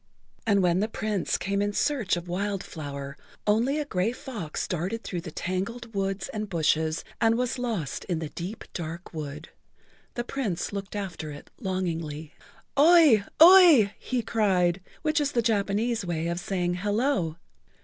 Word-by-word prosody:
And 200 -3 +4
when 175 0 +3
the 210 - +1
Prince 215 -3 -1
came 200 +1 -1
in 205 0 0
search 245 -8 +1
of 175 +1 -6
Wild 195 +2 -2
Flower 140 -3 -7 0.3
only 230 +7 +2
a 300 - -1
gray 190 -4 0
fox 220 - -5
darted 185 +7 -3
through 175 -3 -4
the 170 - -7
tangled 200 +9 -4
weeds 195 -1 -2
and 215 -1 -4
bushes 160 -2 +1 0.2
and 225 0 +4
was 250 +1 -1
lost 225 - -3
in 175 -4 -1
the 160 -1 -4
deep, 185 +8 -6
dark 170 +1 -6
wood. 150 0 -6 0.7
The 240 - -1
Prince 240 -9 -3
looked 200 0 -5
after 190 -6 -4
it 145 -1 -10
longingly. 165 - -3 0.5
"Oi! 305 -9 +7 0.2
Oi!" 330 - +8
he 250 -2 -2
cried 190 -5 +2 0.2
(which 310 0 +2
is 285 -1 -1
the 235 - +2
Japanese 220 +1 +1
way 170 -2 -2
of 170 0 -2
saying 180 -1 -1
"Hello!") 205 - 0
195 Hz, 160 wpm, -27 LUFS, 170-230 Hz, 0.7 s, Oi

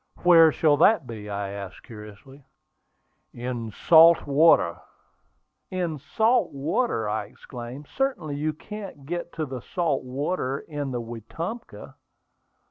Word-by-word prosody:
"Where 165 -3 +7
shall 150 -1 +3
that 170 0 +4
be?" 110 -3 -8
I 100 -1 -3
asked, 100 -3 -8
curiously. 110 +6 -13 0.9
"In 120 -1 -4
the - - -8 0.2
salt 165 0 +7
water." 140 - +4 0.9
"In 175 -4 -2
the - - -14
salt 225 - +1
water!" 140 - -1
I 105 0 -2
exclaimed. 125 +6 -10
"Certainly 180 - -2
you 155 +2 -1
can't 195 -3 -9
get 175 +2 -4
to 155 - -3
the 130 -3 -7
salt 165 - -1
water 135 +1 -2
in 145 -2 -5
the 120 -2 -3
Wetumpka." 160 - -7
145 Hz, 130 wpm, -25 LUFS, 120-170 Hz, 0.9 s, Where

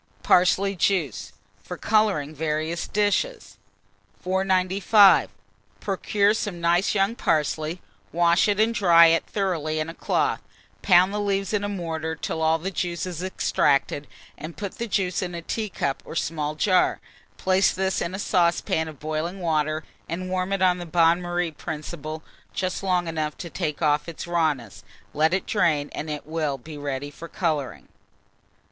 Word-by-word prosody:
PARSLEY 190 +2 +3
JUICE, 165 - 0 0.3
for 180 - -7
Colouring 205 -10 +1
various 155 +2 -2
Dishes. 210 - -1 0.6
495. 190 +2 +4 0.5
Procure 200 +1 +1
some 205 -5 -3
nice 170 +4 +2
young 195 +2 +2
parsley; 155 -3 -1 0.3
wash 170 +3 +3
it 205 0 +1
and 225 +2 +3
dry 170 -6 +6
it 165 - 0
thoroughly 165 -6 -1
in 155 +1 -2
a - - -6
cloth; - - 0 0.4
pound 185 0 +5
the 210 - -1
leaves 195 -1 -1
in 205 -1 0
a 205 - -2
mortar 160 -4 -3
till 160 +1 -4
all 160 0 +3
the 185 +4 -4
juice 175 -1 -2
is 180 -2 -5
extracted, 145 -6 0 0.3
and 155 +3 -8
put 200 -2 -6
the 235 - -2
juice 190 -4 0
in 180 -2 -4
a 170 - -5
teacup 185 -10 -3
or - - -9
small 155 -2 -2
jar; 185 +3 +2 0.4
place 190 +1 +3
this 190 0 -1
in 175 +2 -3
a - - -4
saucepan 170 -4 +1
of 155 -4 -10
boiling 155 +5 -3
water, 155 -2 0 0.3
and 185 +2 -4
warm 185 +1 -1
it 195 -1 0
on 180 -1 +3
the 175 - -7
bain 165 +1 +3
marie 175 -1 -2
principle 155 0 -6 0.3
just 185 -1 -2
long 180 -3 0
enough 155 -2 -3
to 170 - -7
take 150 +2 -3
off 150 +2 +2
its 165 - -7
rawness; 155 - -1 0.3
let 155 +2 +2
it 185 +1 0
drain, 155 -8 +1
and 155 - -5
it 150 -1 -5
will 155 -3 -2
be 155 +5 -11
ready 145 -1 -4
for 170 - -10
colouring. 155 -7 -2
170 Hz, 160 wpm, -24 LUFS, 155-190 Hz, 0.6 s, dry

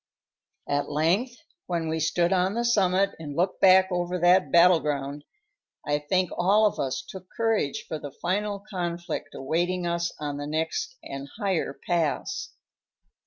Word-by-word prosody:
At 145 0 -1
length, 175 - +1 0.3
when 170 -2 -1
we 160 0 -1
stood 170 +3 +1
on 190 +2 +1
the 235 0 0
summit 195 -4 +3
and 145 -3 -7
looked 180 +3 0
back 190 0 +6
over 175 0 -1
that 180 +2 +4
battle 170 0 +6
ground, 145 -1 -3 0.6
I 145 0 +1
think 180 +4 0
all 205 +5 +4
of 210 - 0
us 130 -2 -2
took 185 -1 -10
courage 225 -11 0
for 155 - -4
the 145 - -7
final 200 +7 -2
conflict 175 -6 -4
awaiting 175 +6 -1
us 170 0 -1
on 145 -1 -4
the 145 0 -5
next 160 - -2
and 140 0 -7
higher 190 -9 -1
pass. 165 -5 -1
175 Hz, 155 wpm, -26 LUFS, 150-190 Hz, 0.6 s, back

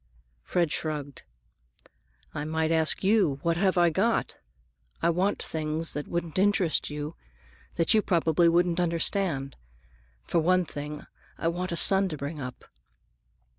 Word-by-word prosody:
Fred 170 -4 0
shrugged. 145 -3 -3 1.1
"I 145 - -4
might 160 +1 -1
ask 160 +2 +1
you, 190 -8 +3
What 170 0 +1
have 190 0 +2
I 175 -1 +4
got? 225 +8 0 0.6
I 170 - +2
want 190 +4 0
things 155 +1 -2
that 150 - -5
wouldn't 170 0 -3
interest 195 -4 +2
you; 150 +2 -5 0.6
that 165 - +2
you 215 - +4
probably 170 -3 +2
wouldn't 175 +1 +2
understand. 170 -5 0 0.7
For 170 - 0
one 180 +2 +2
thing, 150 0 -7 0.3
I 165 - 0
want 180 +2 -3
a - - -1
son 195 +2 +5
to 155 - -5
bring 145 +2 -5
up." 125 -1 -8
165 Hz, 140 wpm, -27 LUFS, 155-180 Hz, 1.1 s, son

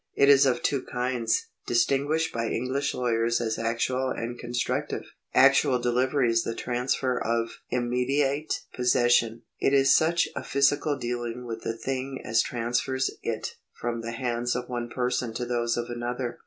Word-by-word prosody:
It 140 - +5
is 140 -1 +7
of 125 -2 0
two 140 -2 +1
kinds, 125 -2 -1 0.2
distinguished 140 +6 +1
by 115 0 -1
English 130 +4 -1
lawyers 115 -1 +1
as 110 -2 -2
actual 120 +3 0
and 120 -1 -4
constr 120 0 -2
active. - - -3 0.3
1 - - -14
Actual 125 - +5
delivery 125 +1 +1
is 115 0 +3
the 115 - -3
transfer 125 +1 -1
of 115 0 -1
immediate 135 +4 0
possession; 120 -2 +2 0.2
it 135 - +2
is 135 -1 +6
such 165 +1 +3
a - - -4
physical 140 +1 +2
dealing 120 -1 -4
with 115 -1 -5
the 115 - -3
thing 130 +2 -3
as 110 +1 +3
transfers 125 +1 -1
it - - -4 0.2
from 115 -1 -2
the 115 0 -5
hands 120 -1 -1
of 125 0 -3
one 120 -1 -4
person 125 -2 -1
to 120 - -2
those 120 -1 0
of 120 - -1
another. 120 +1 -4
125 Hz, 165 wpm, -27 LUFS, 120-130 Hz, 0.3 s, is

